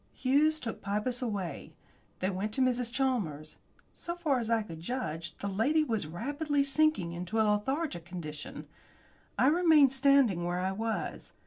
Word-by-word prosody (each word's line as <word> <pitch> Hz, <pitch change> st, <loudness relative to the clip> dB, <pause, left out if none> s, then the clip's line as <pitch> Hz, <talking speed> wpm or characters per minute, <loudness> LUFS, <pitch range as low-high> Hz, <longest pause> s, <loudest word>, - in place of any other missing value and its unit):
Hughes 295 Hz, +4 st, +2 dB
took 230 Hz, -5 st, -5 dB
Pybus 210 Hz, +5 st, -1 dB
away. 200 Hz, -, -4 dB, 0.5 s
They 185 Hz, +2 st, +1 dB
went 200 Hz, +3 st, -3 dB
to 265 Hz, -, 0 dB
Mrs. 250 Hz, -2 st, +1 dB
Chalmers. 215 Hz, -, -2 dB, 0.4 s
So 345 Hz, -, -6 dB
far 310 Hz, -7 st, +1 dB
as 230 Hz, -2 st, -4 dB
I 225 Hz, -1 st, +2 dB
could 165 Hz, -6 st, -9 dB
judge, 165 Hz, -6 st, -4 dB
the 200 Hz, -, -4 dB
lady 240 Hz, +11 st, +2 dB
was 225 Hz, -, -2 dB
rapidly 285 Hz, -, -1 dB
sinking 275 Hz, -, +2 dB
into 180 Hz, +6 st, -3 dB
a 220 Hz, -, +4 dB
lethargic 210 Hz, -, -1 dB
condition. 160 Hz, -4 st, -7 dB, 0.7 s
I -, -, +4 dB
remained 305 Hz, -3 st, +5 dB
standing 265 Hz, -9 st, +4 dB
where 175 Hz, +1 st, -1 dB
I 185 Hz, +1 st, 0 dB
was. 220 Hz, +3 st, -4 dB
230 Hz, 155 wpm, -30 LUFS, 185-275 Hz, 0.7 s, remained